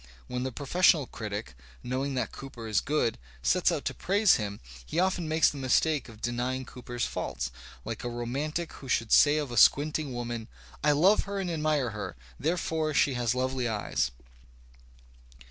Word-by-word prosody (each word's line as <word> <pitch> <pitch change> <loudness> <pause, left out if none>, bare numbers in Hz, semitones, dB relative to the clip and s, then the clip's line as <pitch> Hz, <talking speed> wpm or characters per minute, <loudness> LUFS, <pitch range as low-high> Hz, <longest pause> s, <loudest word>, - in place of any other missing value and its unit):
When 125 - -4
the 130 +1 -2
professional 150 +3 +3
critic, 105 - -6 0.3
knowing 130 +2 -2
that 125 -3 -1
Cooper 125 -4 -8
is 105 -4 +2
good, 145 -6 0 0.2
sets - - +3
out - - -2
to - - -1
praise 200 +2 +3
him, 100 -2 -4 0.2
he 110 - -6
often 185 -2 +1
makes 160 0 +4
the 145 - -7
mistake 135 +1 +2
of 110 -1 -14
denying 125 +2 -1
Cooper's 120 -1 -4
faults, 65 -2 -3 0.3
like 115 0 -5
a 120 - -2
romantic 140 +8 -3
who 135 - -10
should 115 -2 +1
say 150 0 +6
of 145 -4 -2
a 120 - -4
squinting 145 +4 +4
woman: 120 -2 -4 0.4
''I 150 0 +5
love 195 +6 +5
her 200 0 -4
and 185 -3 -2
admire 150 -6 0
her; 105 0 -5 0.2
therefore 160 0 -1
she 140 - +4
has 120 -1 0
lovely 130 -1 0
eyes." 100 - -1
130 Hz, 170 wpm, -29 LUFS, 120-155 Hz, 0.4 s, say